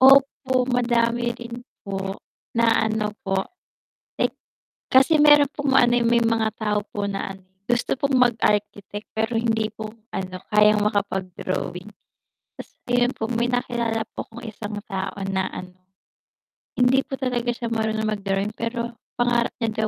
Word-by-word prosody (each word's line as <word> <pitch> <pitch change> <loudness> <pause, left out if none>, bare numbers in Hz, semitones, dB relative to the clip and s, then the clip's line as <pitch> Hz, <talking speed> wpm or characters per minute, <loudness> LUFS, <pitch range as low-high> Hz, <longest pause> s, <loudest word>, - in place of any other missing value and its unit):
Opo, 265 -1 +5
madami 240 -1 +1
rin 235 0 -8 0.2
po 195 0 -4 0.3
na 230 -1 +3
ano 215 -1 -1
po 195 0 +1 0.8
like - - +1 0.5
kasi 270 +4 +5
meron 295 -1 +7
pong 285 -2 -1
ano, 245 -2 +5
eh, 235 - +1
may 235 0 +4
mga 225 -1 +2
tao 210 -1 0
po 205 - -5
na 195 0 -4
ano, 190 - -16 0.2
gusto 240 +1 0
pong 280 -1 +1
mag-architect, 210 -4 +1
pero 220 +2 -1
hindi 225 -1 +1
po 215 -1 -6 0.2
ano, 185 -1 -4 0.2
kayang 210 0 +5
makapag-drawing. 190 -1 -2 0.7
Ta's - - -10 0.2
ayun 245 +1 +3
po, 220 +1 -4
may 240 +1 0
nakilala 235 -2 0 0.2
po - - -3
akong 230 0 -9
1 210 0 -7 0.2
tao 190 -1 -3 0.2
na 190 0 0
ano, 180 0 -8 1.0
hindi 250 +2 +4
po 270 - -3
talaga 245 -2 -1
siya 235 -1 -4
marunong 220 -1 0
mag-drawing, 200 -1 -1
pero 235 0 -3 0.2
pangarap 240 -1 +1
niya 220 -1 0
230 Hz, 145 wpm, -24 LUFS, 210-245 Hz, 1.0 s, meron